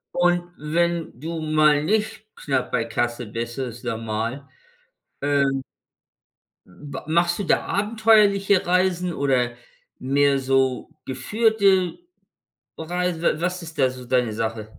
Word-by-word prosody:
Und 175 Hz, 0 st, +2 dB
wenn 165 Hz, -2 st, -1 dB
du 165 Hz, +1 st, -5 dB
mal 155 Hz, -1 st, +3 dB
nicht 215 Hz, +3 st, -1 dB
knapp 135 Hz, -3 st, -2 dB
bei 115 Hz, -, 0 dB
Kasse 120 Hz, +1 st, -2 dB
bist, 115 Hz, +3 st, -5 dB
ist 125 Hz, -2 st, -5 dB
normal, 115 Hz, +3 st, -3 dB, 0.7 s
ähm 140 Hz, -1 st, +1 dB, 1.0 s
ma 140 Hz, +11 st, -9 dB
machst 170 Hz, +2 st, +2 dB
du -, -, -1 dB
da -, -, +1 dB
abenteuerliche 205 Hz, -2 st, +3 dB
Reisen 180 Hz, -1 st, +1 dB
oder 125 Hz, -3 st, 0 dB, 0.4 s
mehr 140 Hz, +1 st, +2 dB
so 130 Hz, -1 st, +1 dB, 0.2 s
geführte 195 Hz, -, +1 dB, 0.8 s
Reisen, 175 Hz, +1 st, -2 dB
wa -, -, +3 dB
was 180 Hz, 0 st, -2 dB
ist 160 Hz, -2 st, -10 dB
da 130 Hz, -2 st, +3 dB
so 125 Hz, -1 st, -10 dB
deine 125 Hz, -3 st, +1 dB
Sache? 110 Hz, 0 st, -4 dB
150 Hz, 120 wpm, -23 LUFS, 125-180 Hz, 1.0 s, mal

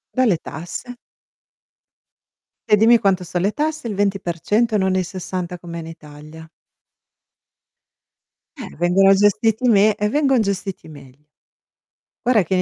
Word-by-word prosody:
Dalle 235 Hz, -10 st, +2 dB
tasse. 175 Hz, +11 st, -8 dB, 1.8 s
E 210 Hz, -, +5 dB
dimmi 230 Hz, +3 st, +5 dB
quanto 190 Hz, -4 st, 0 dB
son 175 Hz, +1 st, -3 dB
le 200 Hz, +3 st, +1 dB
tasse: 305 Hz, -3 st, -3 dB
il 205 Hz, -, -4 dB
20% 205 Hz, +3 st, 0 dB
non 190 Hz, -1 st, 0 dB
il 185 Hz, -, +1 dB
60 180 Hz, -1 st, -6 dB
come 170 Hz, -1 st, -8 dB
in 160 Hz, -, -8 dB
Italia. 155 Hz, 0 st, -13 dB, 2.1 s
Eh, 225 Hz, -8 st, -9 dB
vengono 185 Hz, +3 st, +4 dB
gestiti 215 Hz, +4 st, +2 dB
me 210 Hz, -1 st, +4 dB
e 210 Hz, 0 st, -1 dB
vengon 270 Hz, -3 st, +2 dB
gestiti 195 Hz, -3 st, -4 dB
meglio. 145 Hz, -1 st, -15 dB, 1.0 s
Guarda 225 Hz, -6 st, +4 dB
che 180 Hz, -, -4 dB
in 185 Hz, -, +2 dB
195 Hz, 130 wpm, -20 LUFS, 175-220 Hz, 2.1 s, E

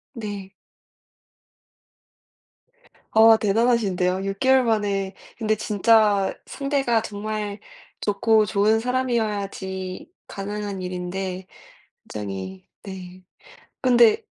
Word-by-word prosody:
네. 205 Hz, -4 st, -6 dB, 2.6 s
아 225 Hz, 0 st, +7 dB
대단하신데요. 200 Hz, -4 st, +1 dB
6개월 260 Hz, +7 st, +3 dB
만에 205 Hz, -4 st, 0 dB, 0.2 s
근데 215 Hz, -2 st, +1 dB
진짜 210 Hz, -1 st, +3 dB
상대가 275 Hz, -5 st, 0 dB
정말 210 Hz, -1 st, -4 dB, 0.4 s
좋고 215 Hz, +1 st, +3 dB
좋은 210 Hz, +2 st, +2 dB
사람이어야지 210 Hz, -6 st, -2 dB, 0.2 s
가능한 200 Hz, -1 st, -5 dB
일인데 185 Hz, +1 st, -4 dB, 0.6 s
굉장히 95 Hz, -2 st, -6 dB, 0.2 s
네 185 Hz, -1 st, -9 dB, 0.6 s
근데 240 Hz, -3 st, +5 dB
205 Hz, 180 characters per minute, -23 LUFS, 190-225 Hz, 2.6 s, 아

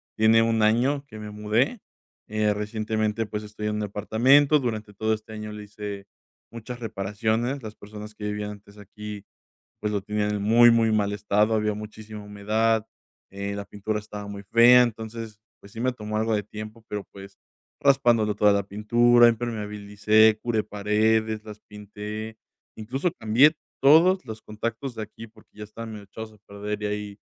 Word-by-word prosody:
tiene 110 Hz, +1 st, +5 dB
1 115 Hz, -1 st, +1 dB
año 125 Hz, +7 st, +2 dB
que 110 Hz, -, -11 dB
me 105 Hz, -1 st, -7 dB
mudé. 110 Hz, -, 0 dB, 0.5 s
Eh, 105 Hz, 0 st, +1 dB
Recientemente, 110 Hz, +1 st, -2 dB
pues, 105 Hz, 0 st, -5 dB
estoy 105 Hz, 0 st, -7 dB
en 105 Hz, 0 st, -1 dB
un 105 Hz, -, -2 dB
apartamento, 125 Hz, +9 st, +4 dB
durante 110 Hz, -5 st, -4 dB
todo 110 Hz, +2 st, -1 dB
este 110 Hz, 0 st, -12 dB
año 105 Hz, 0 st, -6 dB
le 105 Hz, 0 st, -8 dB
hice 105 Hz, -1 st, -7 dB, 0.5 s
muchas 115 Hz, +1 st, -8 dB
reparaciones, 110 Hz, +4 st, -2 dB
las 110 Hz, -1 st, -8 dB
personas 105 Hz, +1 st, -10 dB
que 105 Hz, -, -8 dB
vivían 105 Hz, 0 st, -3 dB
antes 100 Hz, 0 st, -14 dB
aquí, 105 Hz, 0 st, -9 dB, 0.6 s
pues, 105 Hz, -, -1 dB
lo 100 Hz, -2 st, -1 dB
tenían 105 Hz, +1 st, -1 dB
en 100 Hz, -, -2 dB
muy, 120 Hz, +3 st, +7 dB
muy 115 Hz, -1 st, +3 dB
mal 105 Hz, -1 st, +1 dB
estado, 105 Hz, +1 st, +1 dB
había 105 Hz, -1 st, +1 dB
muchísima 105 Hz, 0 st, -9 dB
humedad, 110 Hz, +2 st, 0 dB, 0.4 s
eh, 100 Hz, +1 st, -4 dB
la 100 Hz, 0 st, -5 dB
pintura 105 Hz, +1 st, -3 dB
estaba 105 Hz, -1 st, -8 dB
muy 100 Hz, 0 st, -7 dB
fea, 120 Hz, +4 st, +7 dB
entonces, 110 Hz, -2 st, -4 dB, 0.2 s
pues, 100 Hz, -, -16 dB
sí 115 Hz, -, -7 dB
me 130 Hz, +1 st, +1 dB
tomó 110 Hz, -3 st, -5 dB
algo 110 Hz, 0 st, +1 dB
de 105 Hz, -, 0 dB
tiempo, 110 Hz, +2 st, -9 dB
pero, 105 Hz, -1 st, -4 dB
pues, 100 Hz, 0 st, -12 dB, 0.4 s
raspándole 120 Hz, -6 st, +3 dB
toda 105 Hz, 0 st, +4 dB
la 100 Hz, 0 st, +1 dB
pintura, 120 Hz, +4 st, +4 dB
impermeabilicé, 110 Hz, -1 st, +2 dB
curé 115 Hz, -3 st, 0 dB
paredes, 110 Hz, +1 st, +1 dB
las 105 Hz, -1 st, -10 dB
pinté, 105 Hz, +2 st, -8 dB, 0.4 s
incluso 130 Hz, +10 st, -2 dB
cambié 120 Hz, +8 st, +5 dB, 0.3 s
todos 165 Hz, +6 st, +6 dB
los 110 Hz, -1 st, -7 dB
contactos 115 Hz, +4 st, -5 dB
de 110 Hz, -, -5 dB
aquí 110 Hz, +2 st, -9 dB
porque 110 Hz, -1 st, -22 dB
ya 105 Hz, -, -6 dB
estaban 115 Hz, +2 st, -8 dB
medio 105 Hz, -1 st, -9 dB
echados 110 Hz, +2 st, -9 dB
a 105 Hz, -, -20 dB
perder 105 Hz, +1 st, -5 dB
y -, -, 0 dB
ahí 105 Hz, -1 st, -4 dB
110 Hz, 175 wpm, -25 LUFS, 105-115 Hz, 0.6 s, muy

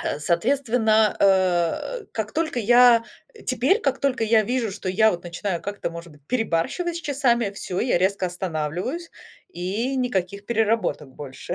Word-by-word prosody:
а, -, -, -2 dB
соответственно, 220 Hz, -, +2 dB
э, 185 Hz, -, +2 dB
как 215 Hz, -1 st, -4 dB
только 315 Hz, -6 st, -1 dB
я, 240 Hz, +1 st, +6 dB, 0.3 s
э, 435 Hz, -, -15 dB
теперь, 260 Hz, -, +1 dB
как 275 Hz, -, 0 dB
только 260 Hz, -4 st, 0 dB
я 220 Hz, 0 st, +4 dB
вижу, 240 Hz, 0 st, -1 dB
что 190 Hz, -, -6 dB
я 220 Hz, +4 st, +4 dB
вот 175 Hz, -1 st, -5 dB
начинаю 175 Hz, +1 st, -3 dB
как-то 205 Hz, -3 st, -4 dB
может 170 Hz, -1 st, -9 dB
быть 145 Hz, -1 st, -22 dB
перебарщивать 250 Hz, -, -1 dB
с -, -, -5 dB
часами, 255 Hz, -8 st, +1 dB
всё, 190 Hz, -2 st, -4 dB
я 235 Hz, -7 st, +2 dB
резко 190 Hz, 0 st, +1 dB
останавливаюсь, 180 Hz, -, -4 dB, 0.4 s
и 205 Hz, +10 st, -3 dB
никаких 200 Hz, -5 st, -2 dB
переработок 220 Hz, -, 0 dB
больше. 135 Hz, +4 st, -7 dB
215 Hz, 155 wpm, -23 LUFS, 180-250 Hz, 0.4 s, я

